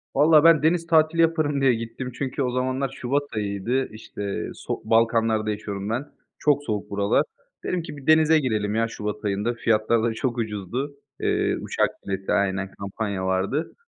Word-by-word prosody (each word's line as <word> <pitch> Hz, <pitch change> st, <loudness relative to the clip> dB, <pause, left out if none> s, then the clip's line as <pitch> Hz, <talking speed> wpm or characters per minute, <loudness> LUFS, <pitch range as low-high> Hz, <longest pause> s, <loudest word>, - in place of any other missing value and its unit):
Vallahi 150 Hz, +1 st, +6 dB
ben 165 Hz, -3 st, +6 dB
deniz 165 Hz, +1 st, +2 dB
tatili 160 Hz, 0 st, +4 dB
yaparım 155 Hz, -4 st, +2 dB
diye 135 Hz, -2 st, +5 dB
gittim. 115 Hz, +3 st, -5 dB
Çünkü 135 Hz, 0 st, -3 dB
o 125 Hz, -, 0 dB
zamanlar 130 Hz, +2 st, -1 dB
Şubat 135 Hz, +2 st, -1 dB
ayıydı. 105 Hz, +5 st, -1 dB
İşte, 105 Hz, -2 st, -5 dB
sok -, -, -6 dB
Balkanlar'da 115 Hz, -1 st, +2 dB
yaşıyorum 105 Hz, -1 st, -4 dB
ben. 120 Hz, +6 st, -1 dB, 0.3 s
Çok 145 Hz, -1 st, +2 dB
soğuk 105 Hz, -6 st, -3 dB
buralar. 100 Hz, 0 st, +2 dB, 0.4 s
Dedim 180 Hz, -, -1 dB
ki 155 Hz, -3 st, -8 dB
bir 140 Hz, -, -12 dB
denize 155 Hz, 0 st, +6 dB
girelim 110 Hz, -6 st, -1 dB
ya 115 Hz, +1 st, +2 dB
Şubat 105 Hz, -1 st, -5 dB
ayında. 105 Hz, +4 st, 0 dB
Fiyatlar 115 Hz, -1 st, +1 dB
da 115 Hz, -1 st, +1 dB
çok 120 Hz, +2 st, -2 dB
ucuzdu. 115 Hz, +6 st, -3 dB, 0.2 s
Eee, -, -, +1 dB
uçak -, -, +1 dB, 0.2 s
bileti 95 Hz, 0 st, -3 dB
Aynen 95 Hz, -1 st, 0 dB
kampanya 100 Hz, -1 st, -3 dB
vardı. 95 Hz, -, -1 dB
115 Hz, 165 wpm, -24 LUFS, 105-145 Hz, 0.4 s, Vallahi